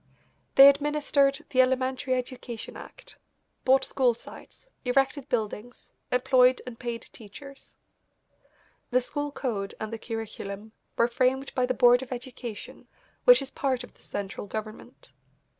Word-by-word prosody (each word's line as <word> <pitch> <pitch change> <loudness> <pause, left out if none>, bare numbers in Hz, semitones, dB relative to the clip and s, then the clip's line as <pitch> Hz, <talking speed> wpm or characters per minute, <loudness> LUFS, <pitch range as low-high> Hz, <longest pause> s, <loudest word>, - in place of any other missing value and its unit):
They 275 +1 +11
administered 280 -1 +2
the 255 - +5
Elementary 260 0 0
Education 250 -2 -6
Act, - - -12 0.4
bought 265 +1 +4
school 250 -4 +1
sites, 235 - -14 0.2
erected 270 +2 +1
buildings, 225 +1 -4 0.2
employed 250 0 +4
and 245 -2 -9
paid 235 -2 -4
teachers. 275 +6 -13 1.1
The 255 0 +3
school 290 +3 -4
code 215 -9 -3
and 220 +1 -5
the 225 - -5
curriculum 220 -2 -6 0.3
were 235 - +4
framed 260 +3 0
by 250 -1 +1
the 255 - -1
Board 245 0 +6
of 265 - -9
Education, 245 -3 -8 0.4
which - - +7
is 270 - -9
part 260 -3 -1
of 245 - -13
the - - -24
central 200 0 -6
government. 215 +1 -8
250 Hz, 135 wpm, -27 LUFS, 230-270 Hz, 1.1 s, They